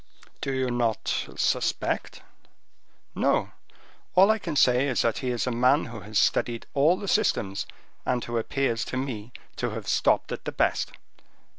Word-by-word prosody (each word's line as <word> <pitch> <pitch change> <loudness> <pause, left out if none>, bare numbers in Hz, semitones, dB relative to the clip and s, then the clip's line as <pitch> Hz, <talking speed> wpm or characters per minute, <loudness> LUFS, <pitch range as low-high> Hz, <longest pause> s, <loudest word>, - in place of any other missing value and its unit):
"Do 135 - -2
you 130 -1 0
not 120 -2 -1
suspect?" - - -1 0.9
"No; - - +1 0.6
all 195 +3 +7
I 220 - +1
can 165 -6 -4
say 125 0 +4
is 130 - +1
that 115 -2 +1
he 130 -2 -2
is 120 -2 -1
a 125 - -1
man 125 +5 +3
who 115 -1 -8
has 105 +1 -4
studied 115 +5 +1
all 155 +6 +4
the 200 - -6
systems, 110 - +1 0.4
and 120 - 0
who 120 0 -1
appears 115 -1 -1
to 130 - -4
me 125 -4 -4 0.3
to - - -1
have - - -6
stopped - - +2
at - - -5
the - - -2
best." - - 0
125 Hz, 165 wpm, -26 LUFS, 115-140 Hz, 0.9 s, all